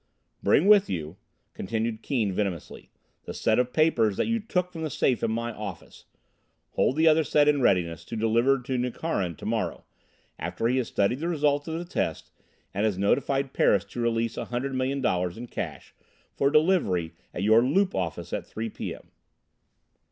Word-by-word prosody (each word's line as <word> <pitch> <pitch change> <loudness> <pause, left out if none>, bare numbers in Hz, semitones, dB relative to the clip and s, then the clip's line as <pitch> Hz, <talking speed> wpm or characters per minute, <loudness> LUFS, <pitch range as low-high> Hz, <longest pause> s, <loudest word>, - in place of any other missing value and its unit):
"Bring 155 - +3
with 205 -1 +6
you," 80 +1 -4 0.4
continued 110 +2 -3
Keane 115 -7 0
venomously, 95 -5 -4 0.4
"the - - -6
set 110 - +2
of 125 0 +1
papers 120 -11 +2
that - - +1
you 230 0 0
took 180 -4 -1
from 165 -2 -7
the 160 - -2
safe 130 -2 +1
in - - 0
my 115 +1 -2
office. 105 -5 -9 0.7
Hold 130 - +1
the 160 +1 +3
other 160 0 +5
set 150 0 +3
in 145 -2 +3
readiness 85 -7 +1
to 115 - -6
deliver 115 +5 +3
to 125 +1 -3
Nukharin 120 - -2
to - - -11
morrow, - - -2 0.6
after 90 +6 -3
he 125 +2 +1
has 125 - 0
studied 100 +6 0
the 165 - -2
results 145 -3 +1
of 160 0 -3
the 175 - -5
test 175 - -3 0.4
and 100 - -1
has 105 -4 +1
notified 135 +7 +1
Paris 100 0 +3
to 120 - -4
release 115 -1 0
a - - -3
hundred 125 +3 -3
million 130 +1 -1
dollars 90 -6 0
in 120 - -6
cash - - -6 0.4
for 140 - +2
delivery 145 - +2 0.2
at 90 - -4
your 110 +2 +6
Loop 185 +10 +2
office 90 -4 -3
at - - -3
3 110 0 -5
p. - - -5
m." - - -15
120 Hz, 185 wpm, -26 LUFS, 100-145 Hz, 0.7 s, with